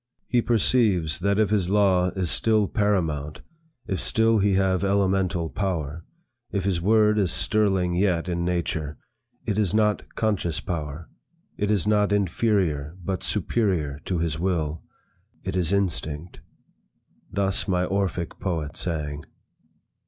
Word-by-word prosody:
He 120 Hz, -1 st, +2 dB
perceives 105 Hz, -, +2 dB
that 100 Hz, +2 st, +1 dB
if 105 Hz, -1 st, +2 dB
his 95 Hz, -4 st, +1 dB
law 95 Hz, -3 st, +3 dB
is 90 Hz, -3 st, 0 dB
still 110 Hz, -2 st, +2 dB
paramount, 80 Hz, -9 st, -1 dB, 0.4 s
if 95 Hz, -, -2 dB
still 115 Hz, 0 st, +2 dB
he 100 Hz, 0 st, +2 dB
have 95 Hz, -1 st, +2 dB
elemental 95 Hz, -3 st, +1 dB
power, 85 Hz, -4 st, -3 dB, 0.5 s
if 100 Hz, -2 st, -1 dB
his 95 Hz, -3 st, 0 dB
word 105 Hz, +2 st, +4 dB
is 95 Hz, -4 st, +2 dB
sterling 95 Hz, -5 st, +1 dB
yet 90 Hz, -2 st, +1 dB
in 85 Hz, -1 st, -1 dB
nature, 80 Hz, -4 st, -2 dB, 0.5 s
it 105 Hz, 0 st, 0 dB
is 105 Hz, -2 st, +1 dB
not 105 Hz, -1 st, 0 dB
conscious 100 Hz, -7 st, 0 dB
power, 80 Hz, -1 st, -5 dB, 0.5 s
it 105 Hz, -, -1 dB
is 105 Hz, -3 st, +1 dB
not 105 Hz, -1 st, +2 dB
inferior 95 Hz, -6 st, 0 dB
but 95 Hz, +1 st, -2 dB
superior 85 Hz, -11 st, 0 dB
to 90 Hz, -, -1 dB
his 80 Hz, -2 st, -1 dB
will. 80 Hz, -4 st, -1 dB, 0.6 s
It -, -, -3 dB
is 90 Hz, -2 st, +1 dB
Instinct.' 85 Hz, -4 st, -2 dB, 0.9 s
Thus 100 Hz, 0 st, +1 dB
my 90 Hz, -2 st, +1 dB
Orphic 95 Hz, -3 st, -2 dB
poet 80 Hz, -5 st, -3 dB
sang. 75 Hz, -3 st, -2 dB
95 Hz, 135 wpm, -25 LUFS, 85-105 Hz, 0.9 s, word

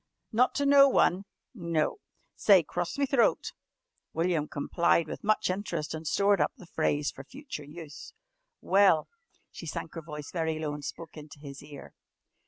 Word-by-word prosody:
"Not 245 Hz, +3 st, +2 dB
to 285 Hz, -, 0 dB
no 280 Hz, 0 st, +7 dB
one?" 190 Hz, -6 st, +2 dB, 0.3 s
"No." 170 Hz, -, -1 dB, 0.4 s
"Say, 195 Hz, -5 st, +5 dB
'Cross 175 Hz, -, -4 dB
me 280 Hz, -, +2 dB
throat.'" 270 Hz, -4 st, +1 dB, 0.6 s
William 165 Hz, -2 st, 0 dB
complied 170 Hz, +3 st, +1 dB
with -, -, -7 dB
much 215 Hz, +1 st, +2 dB
interest 175 Hz, -6 st, -4 dB
and 160 Hz, 0 st, -6 dB
stored 200 Hz, +4 st, +3 dB
up -, -, +1 dB
the 195 Hz, -, -13 dB
phrase 150 Hz, -3 st, -1 dB
for 135 Hz, -, -11 dB
future 270 Hz, -, -9 dB
use. 150 Hz, 0 st, -10 dB, 0.5 s
"Well," 190 Hz, -5 st, +4 dB, 0.4 s
she 170 Hz, -, -9 dB
sank 155 Hz, -, -5 dB
her 165 Hz, -, -6 dB
voice 150 Hz, -2 st, -8 dB
very 160 Hz, -2 st, -1 dB
low 155 Hz, -2 st, -3 dB
and 145 Hz, 0 st, -7 dB
spoke 165 Hz, +3 st, -8 dB
into 150 Hz, 0 st, -11 dB
his 140 Hz, -1 st, -10 dB
ear. 145 Hz, -1 st, -12 dB
165 Hz, 165 wpm, -29 LUFS, 150-200 Hz, 0.6 s, no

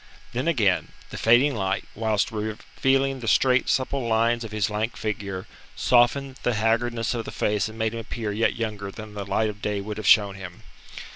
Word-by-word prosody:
Then, 125 Hz, +6 st, -2 dB
again, 110 Hz, -, +1 dB, 0.2 s
the -, -, -7 dB
fading 120 Hz, +5 st, +5 dB
light, 95 Hz, -2 st, -1 dB
whilst 110 Hz, -2 st, 0 dB
revealing 135 Hz, +5 st, -1 dB
the 115 Hz, -, -6 dB
straight, 125 Hz, +3 st, +3 dB
supple 135 Hz, +1 st, 0 dB
lines 115 Hz, +1 st, +2 dB
of 110 Hz, -, -7 dB
his 105 Hz, -3 st, 0 dB
lank 110 Hz, +2 st, -2 dB
figure, 100 Hz, -3 st, -4 dB, 0.3 s
softened 130 Hz, +2 st, +2 dB
the 120 Hz, -, 0 dB
haggardness 115 Hz, +2 st, 0 dB
of 115 Hz, -2 st, -3 dB
the -, -, -7 dB
face 105 Hz, +1 st, 0 dB
and 110 Hz, -, -11 dB
made 110 Hz, 0 st, 0 dB
him 115 Hz, -, -4 dB
appear 115 Hz, -1 st, -4 dB
yet 110 Hz, +3 st, +1 dB
younger 105 Hz, -4 st, -4 dB
than 110 Hz, +1 st, -9 dB
the 100 Hz, -1 st, -6 dB
light 110 Hz, +1 st, +1 dB
of 105 Hz, 0 st, -16 dB
day 105 Hz, -2 st, -1 dB
would 105 Hz, +1 st, -5 dB
have 110 Hz, -1 st, -4 dB
shown 100 Hz, -2 st, +6 dB
him. 95 Hz, -2 st, -10 dB
110 Hz, 195 wpm, -25 LUFS, 105-120 Hz, 0.3 s, shown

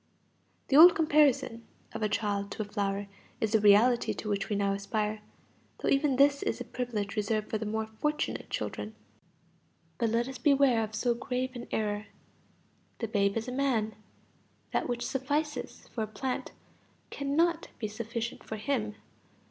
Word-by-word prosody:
The 275 Hz, -, +3 dB
old 340 Hz, +3 st, +10 dB
comparison 290 Hz, -7 st, +3 dB, 0.3 s
of -, -, -5 dB
a 215 Hz, -, +1 dB
child 205 Hz, -1 st, -1 dB
to 215 Hz, -, -3 dB
a -, -, -9 dB
flower 200 Hz, -1 st, -2 dB, 0.3 s
is 220 Hz, -, 0 dB
the 220 Hz, -, +4 dB
reality 210 Hz, +4 st, +5 dB
to -, -, -6 dB
which 200 Hz, 0 st, -1 dB
we 210 Hz, -, 0 dB
now 200 Hz, 0 st, +1 dB
aspire; 210 Hz, +1 st, -2 dB, 0.6 s
though -, -, -1 dB
even 275 Hz, -1 st, +3 dB
this 280 Hz, +1 st, +4 dB
is -, -, -1 dB
a -, -, -3 dB
privilege 225 Hz, -5 st, -3 dB
reserved 215 Hz, 0 st, -1 dB
for 220 Hz, -, 0 dB
the 220 Hz, -, -3 dB
more 220 Hz, +1 st, -1 dB
fortunate 300 Hz, +8 st, -2 dB
children. -, -, -4 dB, 1.0 s
But 230 Hz, -2 st, +2 dB
let 230 Hz, +2 st, +1 dB
us 265 Hz, -, -7 dB
beware 275 Hz, -5 st, +4 dB
of 215 Hz, 0 st, -5 dB
so 240 Hz, +3 st, +1 dB
grave 255 Hz, +1 st, -2 dB
an 240 Hz, -, -7 dB
error. 210 Hz, -1 st, -1 dB, 0.9 s
The 230 Hz, -, -3 dB
babe 200 Hz, -1 st, +2 dB
is 225 Hz, -, -3 dB
a -, -, -3 dB
man. 250 Hz, -5 st, 0 dB, 0.8 s
That -, -, 0 dB
which 240 Hz, 0 st, -2 dB
suffices 290 Hz, +4 st, -2 dB
for 230 Hz, -, -4 dB
a -, -, -3 dB
plant 250 Hz, +5 st, -4 dB, 0.6 s
cannot 320 Hz, +4 st, +1 dB
be 215 Hz, -, -3 dB
sufficient 230 Hz, +2 st, -5 dB
for 220 Hz, -, -5 dB
him. 215 Hz, -2 st, -2 dB
230 Hz, 165 wpm, -30 LUFS, 210-265 Hz, 1.0 s, old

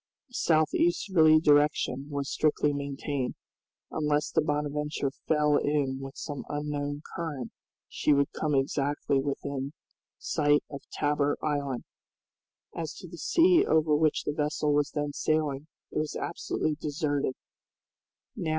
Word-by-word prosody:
A -, -, -23 dB
south 155 Hz, -8 st, +2 dB
easterly 165 Hz, -3 st, +4 dB
direction 145 Hz, -3 st, +3 dB
was 140 Hz, -1 st, -3 dB
strictly 150 Hz, -1 st, +1 dB
maintained. 140 Hz, -2 st, -3 dB, 0.6 s
Unless 150 Hz, -1 st, 0 dB
the -, -, +3 dB
"Bonadventure" 150 Hz, -1 st, -1 dB, 0.2 s
fell 150 Hz, -1 st, +3 dB
in 140 Hz, -3 st, 0 dB
with 135 Hz, 0 st, -8 dB
some 145 Hz, -2 st, -5 dB
unknown 145 Hz, 0 st, -3 dB
current 150 Hz, -8 st, -4 dB, 0.4 s
she -, -, 0 dB
would 140 Hz, -1 st, +3 dB
come 150 Hz, -2 st, -1 dB
exactly 140 Hz, +1 st, +1 dB
within 140 Hz, 0 st, -3 dB, 0.4 s
sight 145 Hz, -2 st, +2 dB
of 140 Hz, -, -6 dB
Tabor 145 Hz, 0 st, +1 dB
Island. 140 Hz, -4 st, -1 dB, 0.9 s
As 160 Hz, -3 st, -4 dB
to 180 Hz, -, -10 dB
the 170 Hz, 0 st, -10 dB
sea 350 Hz, +1 st, +5 dB
over 155 Hz, -, +3 dB
which 155 Hz, 0 st, +2 dB
the 150 Hz, -, -2 dB
vessel 150 Hz, 0 st, 0 dB
was 145 Hz, 0 st, +2 dB
then 145 Hz, -1 st, -3 dB
sailing, 150 Hz, -2 st, 0 dB, 0.2 s
it -, -, -1 dB
was 155 Hz, 0 st, -2 dB
absolutely 155 Hz, -, -2 dB
deserted. 145 Hz, -3 st, -1 dB
145 Hz, 130 wpm, -28 LUFS, 140-155 Hz, 0.9 s, sea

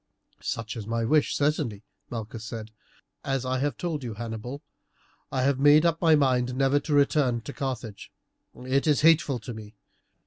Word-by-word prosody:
"Such 115 Hz, 0 st, -4 dB
is 110 Hz, -3 st, -6 dB
my 115 Hz, 0 st, -1 dB
wish, 150 Hz, +4 st, +2 dB
certainly," 140 Hz, -8 st, 0 dB, 0.3 s
Malchus 115 Hz, -1 st, -6 dB
said. 110 Hz, 0 st, -7 dB, 0.5 s
"As 135 Hz, -2 st, -1 dB
I 130 Hz, 0 st, -1 dB
have 145 Hz, +2 st, -1 dB
told 165 Hz, -6 st, -3 dB
you, 115 Hz, -3 st, -5 dB
Hannibal, 120 Hz, +4 st, -6 dB, 0.7 s
I 130 Hz, -1 st, 0 dB
have 135 Hz, 0 st, +2 dB
made 145 Hz, +3 st, +6 dB
up 165 Hz, -1 st, +1 dB
my 165 Hz, -2 st, +6 dB
mind 125 Hz, -3 st, +1 dB
never 135 Hz, +2 st, +3 dB
to 150 Hz, +1 st, -3 dB
return 140 Hz, -4 st, +2 dB
to 145 Hz, -, -8 dB
Carthage. 125 Hz, -7 st, -5 dB, 0.5 s
It 135 Hz, +4 st, +1 dB
is 150 Hz, -2 st, +3 dB
hateful 155 Hz, -4 st, +4 dB
to 120 Hz, +1 st, -8 dB
me. 110 Hz, -1 st, -10 dB
130 Hz, 170 wpm, -26 LUFS, 115-145 Hz, 0.7 s, made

